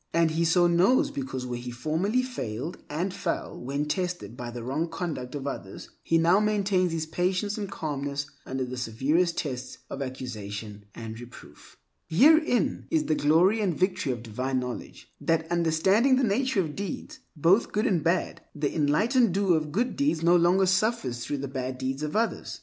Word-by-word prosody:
And 165 -1 +4
he 165 +1 +1
so 175 +2 +4
knows 195 - +4
because 270 - -4
where 120 -1 -4
he 125 0 -6
formerly 160 - 0
failed 150 - -5
and 175 +6 -2
fell - - -3
when 140 +4 -3
tested 180 - -3
by 120 -1 -6
the 120 0 -7
wrong 145 +7 -1
conduct 160 -7 -4
of 140 -1 -5
others, 100 -8 -6
he 165 - +2
now 170 +4 +4
maintains 200 -4 +1
his 160 -1 -2
patience 185 +5 -1
and 205 -3 -4
calmness 145 -4 -3 0.2
under 130 0 -3
the 125 0 -6
severest 145 +9 +1
tests 130 -4 -4
of 140 - -5
accusation 105 -5 -6
and 110 -1 -7
reproof. 120 0 -13 0.3
Herein 280 - +4
is 320 -2 +2
the - - +1
glory 170 +9 +3
and 185 -6 0
victory 185 -6 +1
of 120 -2 -5
divine 130 +4 -2
knowledge, 125 -1 -7
that 160 +2 +1
understanding 175 +10 +3
the 260 - +1
nature 235 0 +2
of 155 -4 -4
deeds, 200 -1 -5 0.2
both 170 +9 +3
good 210 +3 0
and 180 - +1
bad, 170 +3 0
the 145 -1 -2
enlightened 190 - +3
doer 195 -3 +3
of 155 -1 -2
good 240 +8 0
deeds 280 - +1
no 170 +1 +5
longer 175 +3 +4
suffers 185 - 0
through 145 - -3
the 140 0 -4
bad 130 -1 -4
deeds 130 +2 -3
of 150 0 -3
others. 230 +2 -1
165 Hz, 180 wpm, -27 LUFS, 130-195 Hz, 0.3 s, no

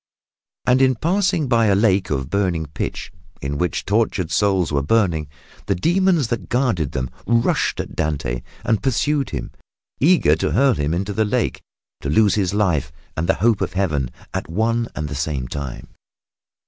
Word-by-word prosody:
And 125 +1 +4
in 130 -1 +4
passing 175 - +1
by 115 -3 +3
a 100 - +4
lake 95 -2 +2
of 65 -3 -2
burning 90 -5 0
pitch, 75 - -5 0.3
in 70 +1 -3
which 90 - -1
tortured 100 -5 0
souls 95 -1 +2
were 70 -1 +1
burning, 85 -2 +1 0.4
the - - +1
demons 175 - +2
that 115 -6 -3
guarded 115 - 0
them 65 -2 -3 0.2
rushed 115 0 +1
at - - -5
Dante 70 -6 -2 0.2
and 110 - +1
pursued 135 +2 +1
him, 70 -5 -5 0.5
eager 150 - +4
to - - -1
hurl 135 +1 +4
him 75 -1 -1
into 95 +3 -2
the 110 - +2
lake 105 - -1 0.4
to 70 - -3
lose 105 +6 +4
his 95 -3 +1
life 90 -8 +1 0.2
and 85 +3 -2
the - - +4
hope 115 -4 +3
of - - -2
Heaven 80 -10 0 0.2
at - - -3
one 115 +6 0
and 75 - -3
the 75 - -5
same 70 -3 -2
time. 70 -2 -6
95 Hz, 175 wpm, -21 LUFS, 75-115 Hz, 0.5 s, And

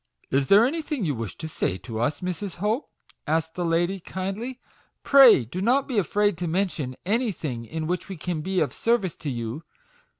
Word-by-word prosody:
" - - -55
Is 135 0 +2
there 205 +3 +7
anything 300 - -2
you 150 - 0
wish 115 -5 -5
to 160 - -5
say 95 - -2
to 110 +3 -6
us, 145 +5 0
Mrs. 185 +1 -4
Hope?" 210 - -1 0.4
said 160 +1 +3
the 180 - -3
lady, 175 +3 +1
kindly; 195 +8 -5 0.4
"pray 260 - +7
do 170 +11 -5
not 255 +6 +2
be 245 -6 +1
afraid 205 0 +1
to 175 - -2
mention 160 -7 -1
anything 180 - -1
in 160 +6 -4
which 180 +4 -2
we 190 - -6
can 165 0 -3
be 185 +2 0
of 140 -6 0
service 225 -7 +1
to 150 - -4
you. 120 +3 -4
180 Hz, 195 wpm, -25 LUFS, 150-210 Hz, 0.4 s, there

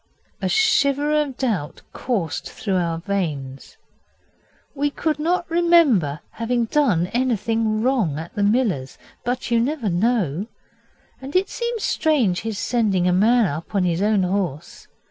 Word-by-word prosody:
A - - 0
shiver 295 -9 +2
of 275 -4 -5
doubt 205 - -2
coursed 195 - -3
through 195 -3 -2
our 170 -2 -1
veins. 155 -8 -4 1.0
We 290 0 0
could 305 +1 -2
not 345 +3 0
remember 325 - +3
having 235 +1 -1
done 225 - +2
anything 225 -3 0
wrong 235 - +1
at 165 +2 -7
the 205 - -3
miller's. 205 - 0 0.3
But 245 0 -3
you 235 - +4
never 250 -2 -1
know. 190 - 0 0.7
And 270 +4 -8
it 375 +1 +2
seemed 470 -2 -3
strange 250 - +1
his 220 -2 -4
sending 205 -8 +1
a 180 - +3
man 225 +5 +4
up 165 +4 -5
on 195 - +2
his 175 0 0
own 210 -2 +2
horse. 180 -6 -3
225 Hz, 145 wpm, -22 LUFS, 180-270 Hz, 1.0 s, you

